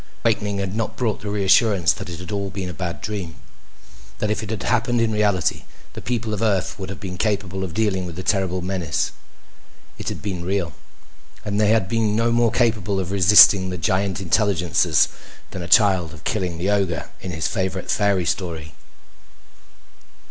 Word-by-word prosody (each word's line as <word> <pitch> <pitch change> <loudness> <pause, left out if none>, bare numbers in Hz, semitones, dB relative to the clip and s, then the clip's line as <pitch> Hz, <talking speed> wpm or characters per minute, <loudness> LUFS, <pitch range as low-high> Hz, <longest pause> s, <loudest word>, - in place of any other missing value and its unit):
And - - -26
the 115 - -2
awakening 105 -2 -2
had 100 0 -3
not 115 -1 -3
brought 115 -4 -1
the 105 - -5
reassurance 100 -2 +3
that - - -8
it 85 -1 -7
had 90 +1 -8
all 100 -1 -2
been 95 0 -5
a - - -6
bad 85 +2 -5
dream. 95 -7 -5 0.8
That 105 - -1
if 105 - -1
it 110 - -7
had 110 -3 -4
happened 120 0 +1
in 115 -1 +1
reality, 105 -5 +1 0.3
the - - -8
people 115 -3 -2
of 105 - -3
Earth 100 -3 0
would 95 -1 -5
have 95 - -7
been 90 -2 -7
capable 95 -3 -1
of 85 -3 -6
dealing 95 -5 0
with 85 - -8
the 95 - -6
terrible 95 -3 0
menace. 90 -4 -1 0.9
It - - -3
had - - -7
been 95 -4 -4
real. 95 -2 -2 0.7
And 105 +1 0
they 105 - +3
had 110 -4 +3
been 110 -1 0
no 115 +1 +2
more 120 0 +3
capable 110 -4 0
of 95 -1 -3
resisting 95 0 +7
the 90 - -4
giant 95 +3 0
intelligences 95 -2 +2 0.4
than 95 - -6
a 85 - -5
child 90 -2 +3
of 75 - -15
killing 90 -5 -2
the 95 +4 0
ogre 95 -5 -1
in 95 - -6
his 80 -2 -2
favorite 95 -1 -2
fairy 100 -4 +1
story. 80 -4 -3
95 Hz, 190 wpm, -22 LUFS, 90-105 Hz, 0.9 s, resisting